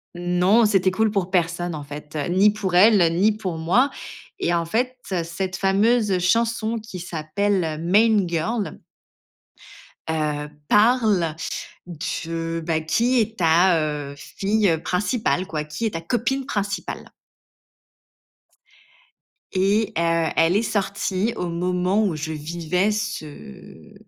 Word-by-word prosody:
Non, 180 +6 +3
c'était 195 -3 +3
cool 215 +3 +1
pour 195 -3 -1
personne, 175 -1 -1
en 150 - -6
fait, 150 +1 -8
ni 195 +4 +5
pour 200 -3 -4
elle 180 -3 +5
ni 200 +5 +4
pour 185 -6 -4
moi, 215 - +2 0.5
et 175 - 0
en 170 -1 0
fait, 250 +8 -1 0.3
cette 185 +3 -4
fameuse 200 +1 +2
chanson 230 +4 +1
qui 215 -3 -9
s'appelle 170 0 -2
Main 210 +3 +4
Girl 170 +6 -2 1.3
heu, 150 -2 -2 0.2
parle, 210 -7 +3 0.5
de, 165 0 -4
bah, 160 -1 0
qui 235 +10 +1
est 220 +1 -2
ta, 170 +1 +4
heu, 150 -2 -3
fille, 200 +8 -1
heu, 160 -1 0
principale, 195 0 0
quoi, 155 -4 -3
qui 150 +9 -4
est - - 0
ta 165 - -4
copine 245 +9 -1
principale 205 -6 -4 2.4
et, 205 +3 +1
heu, 165 -1 +1
elle 165 +3 +3
est 205 - +3
sortie 200 0 -1
au 180 - -3
moment 180 +4 0
où 180 -5 -1
je 155 +1 -4
vivais 170 +5 -1
ce 210 - -7
185 Hz, 125 wpm, -22 LUFS, 165-210 Hz, 2.4 s, ni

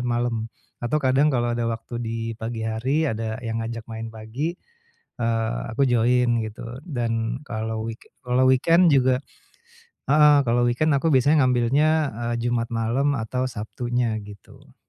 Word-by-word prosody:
malem 120 -2 -1 0.3
atau 125 +6 0
kadang 140 +2 +3
kalau 120 -1 0
ada 120 - -1
waktu 115 +1 -4
di 115 +1 -3 0.2
pagi 115 0 -5
hari, 130 +8 0
ada 110 +1 -3
yang 115 -1 -3
ngajak 115 -1 -5
main 115 0 -6
pagi, 120 +11 -4 0.6
eee, 115 0 0
aku 135 +5 +2
join, 120 0 +3
gitu. 110 +1 -8 0.2
Dan 120 -3 -2
kalau 110 -3 -4
weeke 115 0 -9 0.2
kalau 125 +1 +3
weekend 165 +7 +5
juga 130 -1 +3 0.9
heeh, 150 0 +6
kalau 120 +1 +2
weekend 125 +6 +1
aku 160 +4 +1
biasanya 140 +2 +4
ngambilnya, 130 +4 +2 0.5
eee, 120 +1 -1
Jumat 115 -1 -1
malam 120 +6 +1
atau 125 +3 -2
Sabtunya, 120 +1 -2
gitu. 100 -2 -15
120 Hz, 145 wpm, -24 LUFS, 115-130 Hz, 0.9 s, heeh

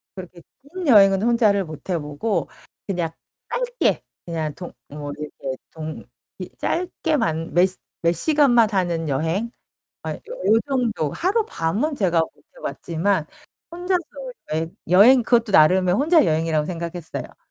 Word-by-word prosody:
그렇게 180 -2 -10 0.2
긴 330 +4 -7
여행은 195 -5 +6
혼자를 215 -4 +3
못 155 +3 -11
해 180 - +1
보고 150 +8 -2 0.4
그냥 175 -4 -1 0.4
짧게 - - 0 0.3
그냥 155 -3 -2
동 175 - -8 0.2
뭐 145 0 -6
이렇게 140 -3 -6
동 155 -1 -7 0.3
이 - - -6
짧게만 300 - -1
몇 175 +2 +5 0.4
몇 170 - +3
시간만 245 - +4
하는 170 -5 0
여행 165 - -1 0.5
아이 - - -3
요 - - -18 0.3
요 220 - +5
정도 235 - 0
하룻밤 335 - 0
은 310 - -1
제가 180 -9 +2
못 160 - -1 0.3
해 - - -14
봤지만 170 0 -1 0.4
혼자서 355 +1 -1 0.5
여행 160 +2 -2
여행 225 +9 +7
그것도 235 -1 +2
나름의 180 +3 +5
혼자 310 - +4
여행이라고 160 -2 +1
생각했어요. 170 -1 -6
185 Hz, 280 characters per minute, -22 LUFS, 160-245 Hz, 0.5 s, 여행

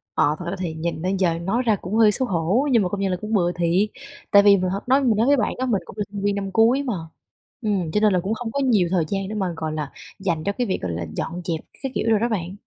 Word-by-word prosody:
Ờ, 150 +1 +3
thật 175 - -6
ra 195 - -3
thì 170 -4 -3
nhìn 160 0 -3
nên 190 +2 0
giờ 170 -3 +1
nói 210 +9 0
ra 220 -2 +4
cũng 190 +5 -4
hơi 220 -2 +6
xấu 260 +3 -1
hổ, 190 - +1
nhưng 230 -5 +4
mà 180 - -1
công 200 +1 -3
nhận 195 -1 0
là 180 - -1
cũng 215 +1 -4
bừa 175 -3 +2
thiệt. 175 +4 +1 0.4
Tại 200 0 +7
vì 200 -1 +7
mình 185 0 0
h - - -1
nói 270 +2 +4
mình 230 -4 +3
nói 230 +4 +2
với 285 0 +5
bạn 235 - 0
á 260 - -1
mình 215 -6 0
cũng - - -12
là 205 - 0
sinh 200 -1 -5
viên 205 0 +1
năm 195 -1 -3
cuối 235 +6 +4
mà, 245 -5 -2 0.7
ừm, 195 -7 -1
cho 210 - +2
nên 210 -2 +4
là 180 - +3
cũng 195 +5 -2
không 225 0 -4
có 280 - -2
nhiều 220 -10 +3
thời 175 -4 +2
gian 195 +1 -2
để 215 - -5
mà, 190 -4 -1
gọi 160 -1 -3
là, 150 -3 -4 0.3
dành 170 -5 -1
cho 200 - 0
cái 245 +3 -2
việc, 185 - -1
gọi 90 -2 -3
là, 85 0 -3
dọn 175 +2 -4
dẹp 165 -2 -1 0.2
các 265 - -2
kiểu 225 - 0
đồ 215 - +5
đó 235 +1 0
bạn. 185 -3 -3
195 Hz, 310 wpm, -23 LUFS, 175-225 Hz, 0.7 s, Tại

